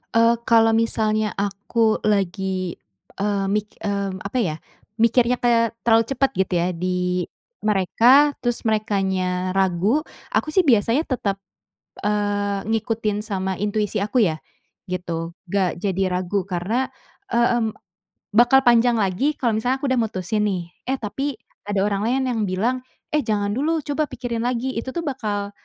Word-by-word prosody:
Eee, 230 +1 +5
kalau 225 -1 +4
misalnya 215 -2 +1
aku 205 +3 +1
lagi, 190 -3 0 0.4
eee, 200 -1 0
mik 210 +1 -2
mmm, 200 -2 -2
apa 200 +7 -4
ya, 155 -4 -1 0.4
mikirnya 235 +2 +3
kayak 230 -2 +3 0.2
terlalu 225 0 +6
cepet 270 +1 +1
gitu 190 -1 0
ya 175 - +1
di 180 0 -1 0.4
mereka, 235 +8 +4
terus 240 -1 0
merekanya 190 -4 0
ragu, 195 - +2 0.3
aku 310 - +1
sih 360 -2 +3
biasanya 235 +6 +3
tetep, 200 -7 -1 0.6
eee, 205 -1 0
ngikutin 220 -1 -1
sama 190 -3 -2
intuisi 210 +1 -1
aku 215 +5 0
ya, 155 -1 -3 0.5
gitu. 170 -2 -3 0.2
Gak 185 -1 0
jadi 195 0 -1
ragu 185 +2 -1
karena, 195 +8 -2 0.4
e 235 - +1
mmm, 240 -2 +2 0.6
bakal 245 +4 +6
panjang 240 0 +5
lagi 210 +10 +1
kalau 240 - +1
misalnya 250 +4 0
aku 275 - 0
udah 260 - +2
mutusin 210 0 -1
nih, 175 -4 -2 0.2
eh 265 - 0
tapi 265 +7 -3 0.3
ada 205 -1 0
orang 200 -1 0
lain 260 +3 +1
yang 225 -2 -1
bilang, 210 +8 0 0.3
"Eh 300 -1 +1
jangan 205 -2 0
dulu 315 +5 0
coba 295 +2 -1
pikirin 235 -4 -4
lagi." 255 +1 -2
Itu 260 +3 -4
tuh 340 - -2
bakal 210 -7 -2
210 Hz, 145 wpm, -22 LUFS, 195-240 Hz, 0.6 s, terlalu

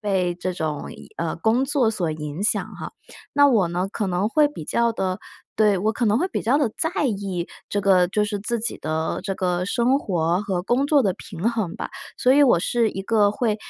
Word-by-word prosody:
被 185 -4 0
这 185 +1 -3
种 155 -4 -4
影 - - -13
呃， 165 -1 -2
工 225 +8 +1
作 265 -5 +2
所 175 -7 -2
影 150 +5 -5
响 - - +1
哈。 - - -7 0.4
那 285 0 +5
我 210 -9 +3
呢 180 +3 -2
可 210 -2 -2
能 185 +3 0
会 300 +4 +4
比 275 - -9
较 235 +5 +1
地 185 -3 -2 0.4
对， 210 -3 +4
我 215 +4 +1
可 235 +2 -2
能 210 +1 +3
会 365 +6 0
比 - - -3
较 255 +6 +2
地 280 - +2
在 320 -2 0
意 195 -5 -3 0.2
这 205 - 0
个 185 -2 +4
就 210 +2 0
是 205 -1 -3
自 230 +3 -2
己 235 - -2
的 160 +1 -2
这 195 -1 -2
个 180 -1 -1
生 240 +7 +2
活 175 - 0
和 185 -3 -2
工 245 +7 +1
作 290 -1 +4
的 195 -5 +1
平 190 +3 -3
衡 220 -8 -2
吧， - - -5 0.3
所 250 - +3
以 290 - +6
我 240 -11 +4
是 230 +1 +1
一 195 - -5
个 205 0 +3
会 215 0 0
205 Hz, 240 characters per minute, -23 LUFS, 180-235 Hz, 0.4 s, 以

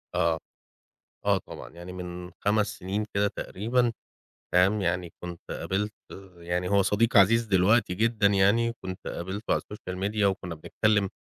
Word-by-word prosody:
آه. 85 -2 +2 0.9
آه - - +4
طبعًا، - - -10
يعني 85 +2 -9
من 90 -1 -7
5 105 0 +3
سِنين 100 +3 -2
كدة 100 0 +3
تقريبًا، 120 +5 0 0.6
فاهم، 95 +4 +4
يعني 90 -2 -1
كنت 85 -1 -6
قابلت 105 +2 -2 0.4
يعني 90 +1 -2
هو 100 0 +4
صديق 105 +4 +2
عزيز 115 +4 +6
دلوقتي 100 0 +3
جدًا 110 +1 +2
يعني 100 +4 +3
كنت 95 0 -6
قابلته 95 +5 -3
على - - +2
الSocial 105 -3 -9
Media 105 +1 0
وكُنّا 95 -3 0
بنتكلِّم، 105 +5 +1
100 Hz, 145 wpm, -27 LUFS, 90-105 Hz, 0.9 s, عزيز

